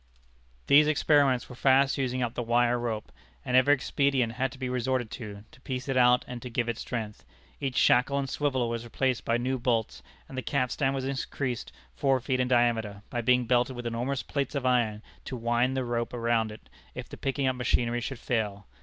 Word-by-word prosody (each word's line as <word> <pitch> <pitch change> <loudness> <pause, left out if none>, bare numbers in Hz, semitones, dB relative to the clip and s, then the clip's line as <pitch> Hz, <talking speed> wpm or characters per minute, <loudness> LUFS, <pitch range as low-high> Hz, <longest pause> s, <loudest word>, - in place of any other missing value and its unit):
These 150 +2 +6
experiments 145 -4 +3
were - - -10
fast 135 +2 +4
using 130 -1 -1
up 120 -1 -2
the - - -3
wire 120 +1 +2
rope, 115 -3 -4 0.3
and 125 - 0
every 130 +3 +6
expedient 135 -3 +1
had 130 +1 -1
to - - -11
be 130 -1 -3
resorted 125 -1 -1
to, 105 -4 -8
to 130 - -19
piece 130 0 -5
it 135 - -1
out 125 0 +4
and 125 -1 -7
to 125 - -7
give 120 0 -1
it 120 -1 -3
strength. 110 -4 -5 0.4
Each 135 -2 -3
shackle 135 +3 +4
and 140 -1 -1
swivel 130 -3 0
was 115 0 -3
replaced 125 +1 -1
by 115 - +2
new 130 +2 -1
bolts, 115 - -1 0.3
and 135 - -10
the 130 - -2
capstan 135 +1 0
was 135 -1 -3
increased 130 - -3 0.2
four 135 -2 +2
feet 130 +1 -1
in 125 - +1
diameter, 115 -5 +1
by 120 - -1
being 125 +1 +3
belted 125 +2 +2
with 120 0 -7
enormous 120 +4 -2
plates 140 0 -3
of 140 -2 -2
iron, 115 -4 +1 0.2
to 130 - -5
wind 120 +3 +1
the 130 - -1
rope 120 0 -2
around 115 -2 +1
it, 105 - -13 0.3
if - - -6
the - - -9
picking 135 0 -2
up 130 -1 +1
machinery 120 -1 0
should 135 +1 -4
fail. 105 -5 -2
125 Hz, 205 wpm, -28 LUFS, 120-130 Hz, 0.4 s, These